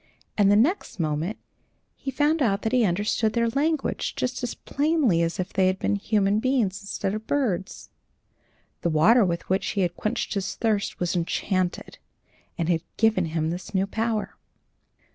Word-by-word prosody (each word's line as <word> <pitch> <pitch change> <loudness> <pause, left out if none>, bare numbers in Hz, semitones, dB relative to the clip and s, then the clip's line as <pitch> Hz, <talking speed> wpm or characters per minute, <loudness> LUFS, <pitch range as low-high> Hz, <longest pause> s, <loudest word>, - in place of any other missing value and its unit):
And 205 -2 +4
the 205 - +5
next 250 - +1
moment 160 +5 -1 0.6
he 275 - -6
found 295 +3 +1
out 200 -6 +1
that 220 - 0
he 250 -3 +3
understood 210 +4 0
their 235 -1 +2
language 295 +4 -1
just 250 0 -2
as 245 -1 -3
plainly 285 - +1
as 170 +1 -1
if 180 - -3
they 190 -1 +3
had 185 0 +1
been 205 - 0
human 205 0 +1
beings 220 -6 0
instead 200 0 -3
of 215 +1 -5
birds. 220 -10 -2 0.9
The 170 - +1
water 190 +10 +5
with 170 -2 -2
which 190 +1 0
he 200 - -1
had 175 -1 0
quenched 215 - -2
his 200 -2 -2
thirst 215 -3 -1
was 180 0 -1
enchanted, 180 +1 -2 0.6
and 165 - -1
had 170 -2 +1 0.2
given 220 -5 +3
him 160 0 -1
this 180 +3 -6
new 190 +1 +2
power. 220 +1 -2
205 Hz, 170 wpm, -25 LUFS, 180-235 Hz, 0.9 s, the